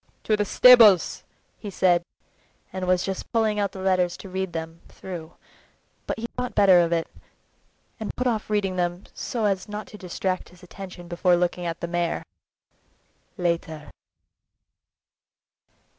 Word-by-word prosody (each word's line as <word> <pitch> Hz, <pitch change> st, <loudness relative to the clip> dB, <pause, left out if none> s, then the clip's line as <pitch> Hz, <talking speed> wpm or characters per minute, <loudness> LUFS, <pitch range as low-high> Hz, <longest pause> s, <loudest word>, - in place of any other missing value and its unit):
"To 215 Hz, -, +2 dB
the 210 Hz, 0 st, 0 dB
stables!" 220 Hz, -5 st, +6 dB, 0.4 s
he 210 Hz, -, -7 dB
said, 180 Hz, -2 st, +3 dB, 0.7 s
and 185 Hz, -1 st, -4 dB
was 180 Hz, 0 st, +2 dB
just 190 Hz, -1 st, -5 dB
pulling 220 Hz, -2 st, +1 dB
out 200 Hz, -2 st, 0 dB
the 190 Hz, -, -9 dB
letters 185 Hz, -2 st, +1 dB
to 195 Hz, -, -10 dB
read 190 Hz, 0 st, -3 dB
them 165 Hz, 0 st, -6 dB
through, 175 Hz, -3 st, -8 dB, 0.7 s
but -, -, -2 dB
he 225 Hz, -, -4 dB
thought 250 Hz, 0 st, -4 dB
better 190 Hz, -3 st, +6 dB
of 170 Hz, -1 st, +2 dB
it, 165 Hz, -1 st, +1 dB, 0.9 s
and 220 Hz, -, -5 dB
put 250 Hz, -, -2 dB
off 225 Hz, -4 st, -1 dB
reading 195 Hz, -3 st, 0 dB
them 175 Hz, +1 st, -1 dB
so 230 Hz, -3 st, -3 dB
as 195 Hz, -1 st, -1 dB
not 210 Hz, +1 st, -5 dB
to 210 Hz, -, -12 dB
distract 185 Hz, +1 st, -3 dB
his 180 Hz, +1 st, -19 dB
attention 180 Hz, -1 st, -10 dB
before 175 Hz, +1 st, +2 dB
looking 175 Hz, 0 st, -1 dB
at 165 Hz, 0 st, -5 dB
the 170 Hz, -, -2 dB
mare. 170 Hz, -1 st, -1 dB, 1.1 s
"Later!" 170 Hz, -4 st, -2 dB
185 Hz, 150 wpm, -24 LUFS, 175-205 Hz, 1.1 s, stables